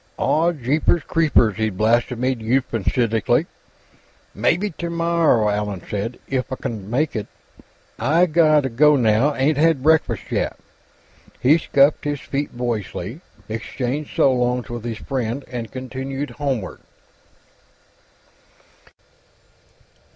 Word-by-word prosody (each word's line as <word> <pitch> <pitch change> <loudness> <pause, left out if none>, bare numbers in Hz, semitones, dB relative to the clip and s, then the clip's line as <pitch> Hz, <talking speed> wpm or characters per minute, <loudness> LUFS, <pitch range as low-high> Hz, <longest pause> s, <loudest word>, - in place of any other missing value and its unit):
"Aw, 165 +3 +2
jeepers 150 +3 +1
creepers!" 130 -10 +2
he 110 0 +1
blasphemed 120 +4 0
euphemistically. 115 -2 +1 0.9
"Mebbe 180 +1 0
t'morrow," 170 -8 +1
Allan 105 -3 -2
said. 105 +4 -3
"If 130 -1 -2
I - - -1
c'n 105 -6 -6
make 145 +6 0
it. 105 -2 -3 0.7
I 155 +10 +3
gotta 155 -4 +3
go, 150 +5 +4
now; 120 +3 +2
ain't 145 +2 +1
had 160 -4 +3
breakfast 160 +1 +2
yet." - - -1 0.8
He 150 +6 +4
scuffed 140 -1 +3
his 145 -1 -2
feet 140 -3 -4
boyishly, 115 - -4 0.3
exchanged 125 +6 -4
so 135 - +4
longs 125 -1 -1
with 120 -1 -6
his 115 -2 -4
friend, 130 +1 -3
and 120 -2 -5
continued 135 +2 -5
homeward. 135 -10 -3
130 Hz, 110 wpm, -21 LUFS, 115-150 Hz, 0.9 s, go